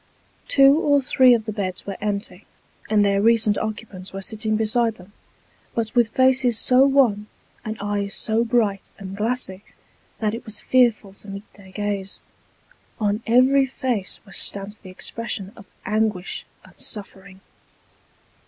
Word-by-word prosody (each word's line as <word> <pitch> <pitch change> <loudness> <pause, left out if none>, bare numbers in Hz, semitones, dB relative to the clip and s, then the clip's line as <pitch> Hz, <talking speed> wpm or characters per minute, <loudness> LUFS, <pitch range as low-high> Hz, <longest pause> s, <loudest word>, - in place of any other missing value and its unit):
Two 275 +2 +6
or 285 -3 +3
three 255 -1 +4
of 220 -2 -3
the 215 - -3
beds 185 -3 -4
were 195 - -5
empty, 205 0 -4 0.4
and 210 -1 +4
their 200 0 +2
recent 220 -1 +4
occupants 210 -4 -6
were 195 - -6
sitting 215 0 -1
beside 225 +1 +1
them, 185 +2 -17 0.6
but 225 -2 -2
with 240 -2 +4
faces 260 -1 +3
so 255 +3 +5
wan, 240 -7 +2 0.4
and 215 0 -5
eyes 200 -1 -2
so 225 +1 +1
bright 220 -5 0
and 195 -1 -8
glassy, 210 -3 -2 0.5
that 215 -1 -1
it 230 - -6
was 215 -2 -2
fearful 235 -6 +2
to 200 - -14
meet 195 +1 -9
their 200 -2 -16
gaze. 200 -1 -4 0.8
On 210 0 0
every 260 +3 +4
face 250 -7 -3
was 195 - -4
stamped 200 +1 -2
the 190 - -11
expression 195 +1 -5
of 200 -4 -14 0.2
anguish 210 -3 -1 0.2
and - - -20
suffering. 195 -2 -6
215 Hz, 150 wpm, -22 LUFS, 200-235 Hz, 0.8 s, Two